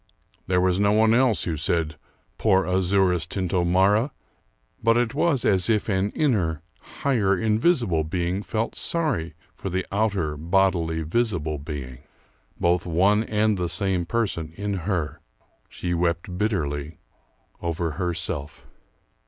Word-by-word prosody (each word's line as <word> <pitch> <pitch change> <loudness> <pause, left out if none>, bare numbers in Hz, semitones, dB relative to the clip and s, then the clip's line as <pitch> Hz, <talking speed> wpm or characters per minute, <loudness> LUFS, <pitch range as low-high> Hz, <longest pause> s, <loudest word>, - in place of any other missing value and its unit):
There 90 0 +2
was 90 0 +2
no 100 0 +3
one 110 +1 +4
else 125 -2 +3
who 85 - -2
said 80 +1 -1 0.4
"poor 95 -3 +3
Azouras 90 -2 +2
Tintomara!" 95 - +2 0.7
but 115 +1 +3
it 120 -2 +1
was 145 -3 +1
as 95 -1 +3
if 110 -1 +1
an 95 0 +1
inner, 90 - 0 0.4
higher, 105 -9 +2
invisible 110 - +2
being 85 +4 -2
felt 110 +2 -2
sorry 120 - -2 0.2
for 95 - -6
the 95 +1 -2
outer, 100 -7 0
bodily, 85 -1 +1
visible 80 -5 -1
being, 70 -4 -7 0.6
both 85 0 +1
one 100 +6 +3
and 105 -2 +1
the 90 -1 -1
same 90 0 0
person 85 -8 -2
in 100 +2 -3 0.2
her. 80 -7 -2 0.5
She 90 -1 -3
wept 85 +1 -1
bitterly 80 -7 -2 0.6
over 85 -1 -2
herself. 85 -3 -3
95 Hz, 130 wpm, -24 LUFS, 85-105 Hz, 0.7 s, one